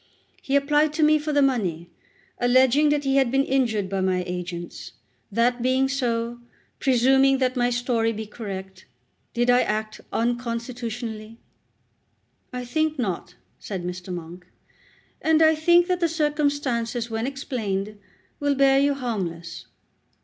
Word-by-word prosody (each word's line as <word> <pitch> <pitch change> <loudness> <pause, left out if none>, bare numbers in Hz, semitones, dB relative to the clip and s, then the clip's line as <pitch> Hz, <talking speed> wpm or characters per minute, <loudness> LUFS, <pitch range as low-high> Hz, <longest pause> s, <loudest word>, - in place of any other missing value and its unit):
"He 275 - -1
applied 295 +2 +3
to 310 - +1
me 305 0 +5
for 300 +1 -3
the 290 -1 +3
money, 180 -11 -1 0.5
alleging 260 +4 +4
that 295 0 +1
he 270 0 +1
had 265 -3 +3
been 270 +2 +2
injured 235 -8 0
by 195 0 -2
my 185 -1 +1
agents. 175 -1 -6 0.4
That 240 +3 +1
being 260 +2 +2
so, 240 -3 -2 0.4
presuming 265 +1 +4
that 255 -1 0
my 245 -1 +2
story 240 -2 0
be 220 0 -5
correct, 190 -3 -8 0.5
did 240 +1 +3
I 245 0 +5
act 215 0 -3
unconstitutionally?" 235 -2 -3 1.1
"I 250 -1 -5
think 310 +4 0
not," 185 -6 -3 0.2
said 190 -4 -5
Mr. 180 +1 -6
Monk, 175 +1 -8 0.7
"and 320 0 +3
I 315 0 +6
think 345 +3 +4
that 360 -1 0
the 340 -2 +2
circumstances, 285 -7 -1
when 225 +2 -2
explained, 215 -7 -3 0.4
will 285 -1 +1
bear 270 0 +4
you 285 0 +2
harmless." 180 -10 -5
245 Hz, 140 wpm, -24 LUFS, 215-275 Hz, 1.1 s, I